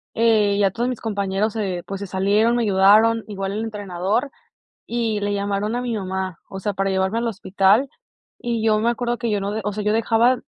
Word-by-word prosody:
eh, 215 -3 +3
ya 195 -2 +3
todos 240 +4 -1
mis 250 - -5
compañeros, 205 0 -1
eh, 185 -5 -2
pues 195 0 -5
se 200 - -5
salieron, 205 +5 +2
me 240 - +1
ayudaron 215 +3 +4
igual 195 -1 -4
el 215 - -3
entrenador 205 +4 -2 0.6
y 230 -3 -1
le 205 0 -1
llamaron 200 +2 -1
a 245 - -2
mi 240 -2 -2
mamá, 190 -4 -4
o 190 - -7
sea, 205 +2 -1
para 195 0 0
llevarme 190 +4 0
al 235 0 -1
hospital. 200 +4 +2 0.5
Y 235 -2 -2
yo 215 -1 +3
me 230 - +1
acuerdo 240 0 -2
que 235 -2 -2
yo 205 -1 0
no, 200 +1 -3
o 210 - -1
sea, 210 - -3
yo 210 - +2
dejaba 230 +3 +3
210 Hz, 210 wpm, -22 LUFS, 195-230 Hz, 0.6 s, ayudaron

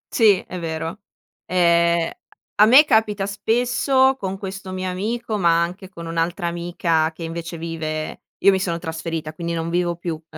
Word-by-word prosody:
Sì, 210 -5 +5
è 180 - -6
vero. 165 +2 -4 0.5
Ehm, 170 -1 +3 0.5
a - - +10
me 270 +6 +8
capita 215 -6 +2
spesso 245 +6 +2
con 195 -6 -4
questo 195 -1 -7
mio 185 0 -3
amico, 215 +4 -2
ma 170 -2 +4
anche 185 +2 -6
con 170 -3 -9
un'altra 165 +2 -2
amica 170 -2 0
che 165 +1 -10
invece 165 +1 -5
vive 160 -1 -4 0.2
io 200 - +7
mi 190 - +1
sono 175 -3 -1
trasferita, 160 -2 -5
quindi 170 +1 -4
non 165 0 -3
vivo 175 0 0
più, 170 0 -4
uhm, 160 +1 -10
175 Hz, 170 wpm, -22 LUFS, 165-195 Hz, 0.5 s, a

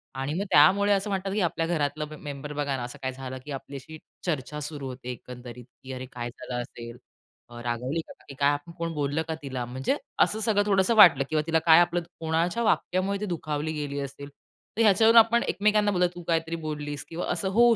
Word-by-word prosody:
आणि 135 +2 -2
मग 185 +5 -1
त्यामुळे 200 +8 +6
असं 200 +1 0
म्हणतात 195 0 -2
की 210 - 0
आपल्या 165 -2 0
घरातलं 150 -2 -1
म - - -7
मेंबर 145 0 -6
बघा 145 -1 -1
ना 125 - -4
असं 120 - -8
काय 130 - -2
झालं 130 0 -7
की 150 - -7
आपल्याशी 140 +3 -8 0.3
चर्चा 150 -3 -2
सुरू 145 -2 -5
होते 125 -1 -8
एकंदरीत. 125 -1 -10 0.2
की 130 - -8
"अरे, 130 0 -6
काय 120 -1 -4
झालं 120 0 -5
असेल? 120 -1 -9 0.5
अ, 120 0 -9
रागवली 125 +6 -2
का - - -10
काकी 140 - -14
काय? 140 0 +4
आपण 145 +4 -6
कोण 165 0 -2
बोललं 145 +1 -1
का 160 - -2
तिला?" 130 -3 -4
म्हणजे 130 - -1 0.3
असं 215 - 0
सगळं 215 -2 +2
थोडंसं 195 +3 +3
वाटलं 170 -10 +8
किंवा 155 -1 +1
तिला 165 0 +3
काय 160 0 +8
आपलं 175 0 +1 0.2
कोणाच्या 165 +7 0
वाक्यामुळे 195 -2 +1
ती 210 - -2
दुखावली 155 -4 -3
गेली 145 -2 -3
असेल. 140 +1 -7 0.5
तर - - +2
ह्याच्यावरून 225 +2 +6
आपण 230 +1 +4
एकमेकांना 210 +1 +2
बोलतो, 180 -2 +3
तू 175 - -8
काहीतरी 165 0 0
बोललीस 150 -2 -4
किंवा 165 +1 -4
असं 185 +2 -1
होऊ 240 -1 +7
155 Hz, 210 wpm, -27 LUFS, 135-185 Hz, 0.5 s, वाटलं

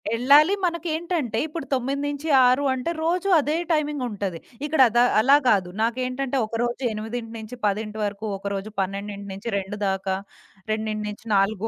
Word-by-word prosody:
ఎళ్ళాలి. 290 +9 +6
మనకేంటంటే 335 - -2
ఇప్పుడు 315 -2 -6
9-6 275 0 +2
అంటే 260 +6 -2
రోజు 360 +4 0
అదే 300 +2 0 0.2
టైమింగుంటది. 250 - -1 0.3
ఇక్కడ 300 -2 +2
అదా 240 +2 +4 0.2
అలా 275 +6 +6
కాదు. 190 -4 +2
నాకేంటంటే 255 +3 -1
ఒకరోజు 240 +3 -2
8-10 220 -1 -4
వరకు 205 +1 -4
ఒకరోజు, 200 +1 -4
12-2 200 +1 -4
దాకా, 190 0 -1 0.6
2-4 215 -1 -1
235 Hz, 105 wpm, -24 LUFS, 205-280 Hz, 0.6 s, ఎళ్ళాలి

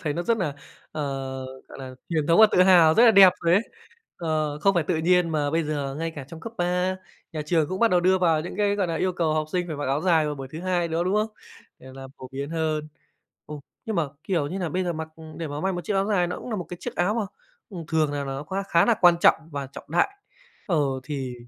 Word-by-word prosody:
thấy 150 -3 -2
nó 170 - -3
rất 230 +6 +1
nà, 165 -9 -2 0.4
ờ, 155 - -3 0.7
gọi - - -11
nà, 130 -1 -8
truyền 155 -3 -1
thống 165 +5 +5
và 220 - +10
tự 180 - +6
hào, 170 -4 +6
rất 235 - +6
là 230 - +8
đẹp 195 -3 +8
rồi 170 0 +2
đấy! 200 - +3 0.5
Ờ, 155 -3 -2
không 195 +5 +2
phải 170 - +2
tự 160 - 0
nhiên 175 +1 +2
mà 150 -2 0
bây 165 +2 +1
giờ 145 -3 -3
ngay 165 0 -2
cả 140 - -6
trong 165 - -10
cấp 225 +6 -8
3, 180 +1 0 0.4
nhà 155 -2 -3
trường 160 -2 +1
cũng 190 +3 -4
bắt 230 - +4
đầu 180 - +3
đưa 185 +1 +3
vào 165 -4 +2
những 175 +4 -7
cái, 205 -1 +1
gọi 195 -3 0
nà, 165 - -2
yêu 185 +2 0
cầu 160 -3 0
học 155 -1 0
sinh 180 -1 0
phải 155 - -5
mặc 145 - -4
áo 135 +3 0
dài 165 -4 +3
vào 150 - -2
buổi 135 -1 -8
thứ 160 - -6
Hai 180 -2 0
nữa, 165 +2 -1
đúng 185 +2 0
không? 215 +1 +1 0.5
Để - - -16
làm 135 0 -10
phổ 130 - -9
biến 140 +2 -5
hơn. 155 -2 -2 0.6
Ồ! 150 -1 -8 0.2
Nhưng 220 -2 -3
mà, 165 -3 +1 0.2
kiểu 170 -7 -1
như 180 - -5
nà, 175 -3 -2
bây 185 +4 -1
giờ 175 -1 -2
mặc 160 0 -5 0.3
để 165 - -4
mà 145 +1 -5
may 190 0 0
một 175 - -4
chiếc 205 - -2
áo 195 0 +1
dài 190 -5 +1
nó 180 - -5
cũng - - -8
nà 220 - -2
một 180 - -4
cái 175 - -7
chiếc - - -6
áo 180 +4 +1
mà, 225 -3 -1 0.4
ừm, 175 -5 -7
thường 155 -2 +1
là 145 -1 -2
nó 135 +1 -5
kh 150 - -9 0.2
khá 170 - +4
là 235 - +4
quan 175 -2 +7
trọng - - +6 0.2
và 140 -2 -4
trọng 135 - -11
đại. 175 - +3 0.6
Ờ, 175 - +1 0.3
thì 130 -3 -5
165 Hz, 275 wpm, -25 LUFS, 150-185 Hz, 0.7 s, và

